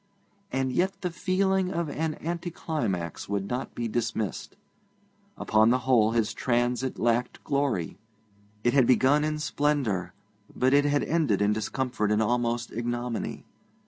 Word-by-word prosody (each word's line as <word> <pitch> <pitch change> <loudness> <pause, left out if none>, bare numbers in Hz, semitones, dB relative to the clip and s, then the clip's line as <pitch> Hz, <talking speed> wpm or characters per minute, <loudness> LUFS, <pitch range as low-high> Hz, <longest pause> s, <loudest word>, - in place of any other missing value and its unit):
And 130 -1 -1
yet 190 +5 0
the 180 - -2
feeling 190 +1 +1
of 170 -1 -1
an 155 +1 -2
anticlimax 160 - -3
would 100 -1 -1
not 125 +5 -4
be 120 - -2
dismissed. 110 -4 -3 0.8
Upon 110 +1 +3
the 125 - +4
whole, 115 -4 +4
his 115 -2 +1
transit 125 +1 0
lacked 120 +1 0
glory. 140 - -1 0.6
It 120 - +2
had 135 -4 +5
begun 135 +3 +4
in 155 0 -1
splendour, 145 - -1 0.4
but 130 +1 +2
it 145 0 +5
had 145 0 +2
ended 155 - +1
in 105 +1 +3
discomfort 110 0 -1
and 105 - +3
almost 120 0 0
ignominy. 120 +1 -3
125 Hz, 140 wpm, -27 LUFS, 110-150 Hz, 0.8 s, had